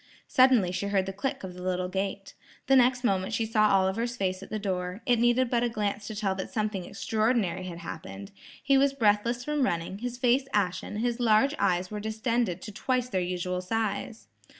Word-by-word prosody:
Suddenly 255 -8 +4
she 195 +2 -2
heard 195 -2 +1
the 195 - -5
click 200 +5 -3
of 185 -1 -6
the 180 - -10
little 180 0 -1
gate. 195 +1 -4 0.3
The 270 - +4
next 250 0 +4
moment 195 0 0
she 225 - 0
saw 215 -1 +3
Oliver's 200 +6 +1
face 185 -2 -1
at - - -10
the 215 - -2
door. 185 0 -3
It 245 -2 +3
needed 240 +2 +3
but 240 -1 +2
a 240 - +1
glance 205 -2 -2
to 220 - -6
tell 205 -2 0
that 190 - -4
something 210 -4 -2
extraordinary 210 -2 0
had 175 -2 -6
happened. 100 - -8 0.3
He 275 -1 +4
was 275 0 +3
breathless 235 0 +1
from 300 -1 -1
running, 175 -4 -1
his 245 +1 -4
face 250 +2 +2
ashen, 195 0 -1
his 240 +2 -1
large 235 +4 +4
eyes 180 +1 +1
were 210 - -4
distended 220 -3 -1
to 210 - -7
twice 250 +4 -1
their 190 -6 0
usual 180 0 -2
size. 220 +3 -3
210 Hz, 200 wpm, -28 LUFS, 185-240 Hz, 0.3 s, Suddenly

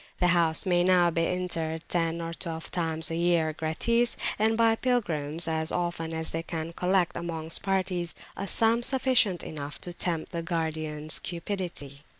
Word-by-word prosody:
The 180 - +3
house 165 -2 +3
may 175 -2 +3
now 180 -1 +4
be 165 0 +1
entered 165 -3 -2
ten 165 -1 0
or 165 0 -4
twelve 165 -1 -6
times 160 -2 +1
a - - -1
year 170 -2 +2
gratis; 230 +10 +1 0.2
and 220 +1 +2
by 225 -1 +4
pilgrims 170 - 0
as 160 0 0
often 170 -2 -2
as 160 0 -1
they 165 - -2
can 165 0 -5
collect, 180 0 +1
amongst 165 -1 -3
parties, 185 -4 0 0.2
a 200 - -4
sum 230 +3 +3
sufficient 245 - +3
to 150 +3 -6
tempt 170 -2 -2
the 170 - -3
guardians 155 -2 -2
cupidity. 170 -6 -5
170 Hz, 155 wpm, -28 LUFS, 160-185 Hz, 0.2 s, now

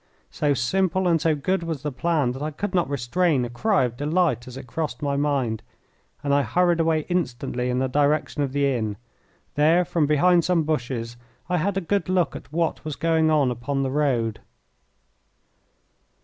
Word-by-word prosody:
So 145 -1 +1
simple 185 +8 +1
and 165 -3 +2
so 160 -2 +2
good 185 +6 -1
was 165 -5 -4
the 150 - -2
plan 150 -2 0
that 130 +2 -7
I 150 - -1
could 185 +7 -4
not 175 -6 +1
restrain 140 +2 +1
a 120 - -7
cry 200 - +2
of 120 -2 -2
delight 145 -3 0
as 125 0 -8
it 135 - -8
crossed 150 +1 -4
my 140 -1 0
mind, 140 -6 0 0.6
and 140 -1 +1
I 145 - +4
hurried 175 +7 +2
away 160 -1 +2
instantly 125 -7 -2
in 125 - 0
the 130 +1 +1
direction 145 +2 +1
of 140 -2 -1
the 140 +1 +1
inn. 110 -7 -1 0.6
There, 160 +4 +3
from 165 -4 +1
behind 170 +4 +4
some 170 -2 +2
bushes, 125 -6 -3 0.3
I 180 - +1
had 195 +4 0
a - - 0
good 195 +2 -1
look 180 -4 +1
at - - -10
what 165 0 -1
was 155 -2 -4
going 160 0 +2
on 145 -5 +3
upon 135 +3 -2
the 135 - -1
road. 130 -6 0
150 Hz, 190 wpm, -24 LUFS, 130-170 Hz, 0.6 s, I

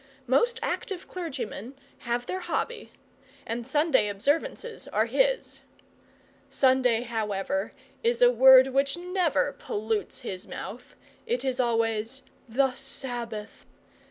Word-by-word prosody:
Most 370 - +2
active 375 -2 -3
clergymen 270 - -6 0.2
have 240 0 -2
their 370 - -3
hobby, 460 +4 -3 0.5
and 230 +1 -4
Sunday 295 -5 +3
observances 290 - -2
are - - +1
his. - - +1 0.9
Sunday, 255 -3 +3
however, 210 -4 -2 0.3
is 235 0 +1
a 245 - +7
word 260 +1 +8
which 275 +4 +1
never 355 -5 0
pollutes 215 -2 -3
his 185 -1 -5
mouth - - -8 0.3
it 470 - -1
is 260 -1 -1
always 230 +1 0 0.3
'the 265 +3 +2
Sabbath'. 240 -5 -5
255 Hz, 110 wpm, -27 LUFS, 225-290 Hz, 0.9 s, word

